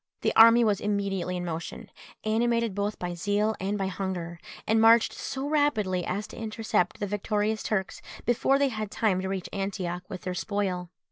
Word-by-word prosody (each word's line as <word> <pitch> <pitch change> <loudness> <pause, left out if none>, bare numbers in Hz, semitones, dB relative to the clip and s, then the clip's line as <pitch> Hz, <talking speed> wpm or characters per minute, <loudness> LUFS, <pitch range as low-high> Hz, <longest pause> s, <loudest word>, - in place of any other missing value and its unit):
The - - 0
army 230 +1 +8
was 210 -3 +1
immediately 195 -3 -1
in 175 - -4
motion, 165 -1 -6 0.3
animated 230 0 +1
both 205 +2 -2
by 175 -1 -4
zeal 205 +5 0
and 195 +2 -1
by 195 - -1
hunger, 180 -3 -4 0.3
and 220 0 +3
marched 225 0 +6
so 270 +1 -4
rapidly 220 - +1
as 200 +3 -2
to - - -11
intercept 220 -4 -1
the 205 - -1
victorious 210 +2 -1
Turks 190 -3 -2 0.2
before 245 +3 +3
they 280 -1 +2
had 215 -3 -4
time 200 -4 +1
to 190 - -3
reach 190 -2 -3
Antioch 185 -3 -3
with 190 -3 -6
their 185 - -3
spoil. 185 -2 -2
205 Hz, 180 wpm, -27 LUFS, 185-220 Hz, 0.3 s, army